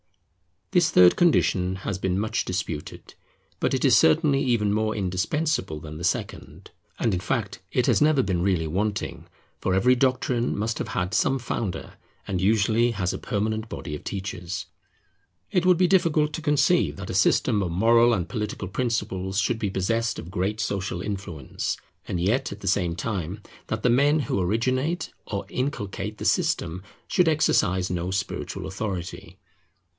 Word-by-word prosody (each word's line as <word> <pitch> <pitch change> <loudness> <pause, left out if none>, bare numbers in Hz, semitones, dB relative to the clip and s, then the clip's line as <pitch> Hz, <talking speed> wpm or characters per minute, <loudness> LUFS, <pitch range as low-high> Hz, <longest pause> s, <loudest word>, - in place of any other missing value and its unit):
This 175 -4 +4
third 90 - +6
condition 95 - +3
has 95 -2 -2
been 95 -1 0
much 110 +2 0
disputed; 90 -5 -5 0.5
but - - 0
it - - 0
is - - +6
certainly 135 - +4
even 115 -6 +1
more 110 0 0
indispensable 95 - -1
than 75 0 -8
the 85 - -7
second. - - -3 0.3
And 115 - +1
in 90 - 0
fact 105 0 -2
it 125 - +1
has - - +3
never 150 -3 +4
been 95 -3 -1
really 90 -4 +1
wanting, 100 +6 -2 0.3
for 95 - 0
every 125 +7 +4
doctrine 125 -2 +1
must 110 +2 -2
have - - -3
had 90 0 -2
some 135 0 +2
founder, 115 -5 -4 0.3
and 90 -2 -2
usually 110 +4 +3
has 95 -5 -1
a - - -5
permanent 110 +2 -2
body 80 -2 -6
of - - -9
teachers. 95 -1 -4 0.9
It 180 -1 +2
would 180 -2 +6
be 180 +1 +4
difficult 165 -5 +3
to 165 - -4
conceive 145 - +2
that - - -7
a - - -4
system 105 - +3
of 95 - -1
moral 115 +7 +4
and 90 -5 -1
political 105 -5 -4
principles 95 -4 -1
should 110 +3 0
be 105 - -1
possessed 115 +5 0
of 85 - -8
great 95 +4 -1
social 95 -3 -2
influence, 95 -8 -4 0.3
and 90 - -2
yet 115 +9 +1
at 100 - -13
the 100 - -6
same 90 -3 +1
time 95 0 -4 0.3
that 110 0 -3
the 125 - +4
men 145 +5 +4
who 110 -6 -1
originate 130 - 0 0.2
or 100 -2 -3
inculcate 105 -6 -3
the 105 - -6
system 90 -4 +1 0.3
should 180 -2 +2
exercise 95 - +2
no 90 0 -2
spiritual 95 +1 -3
authority. 95 -5 -5
105 Hz, 165 wpm, -25 LUFS, 95-125 Hz, 0.9 s, third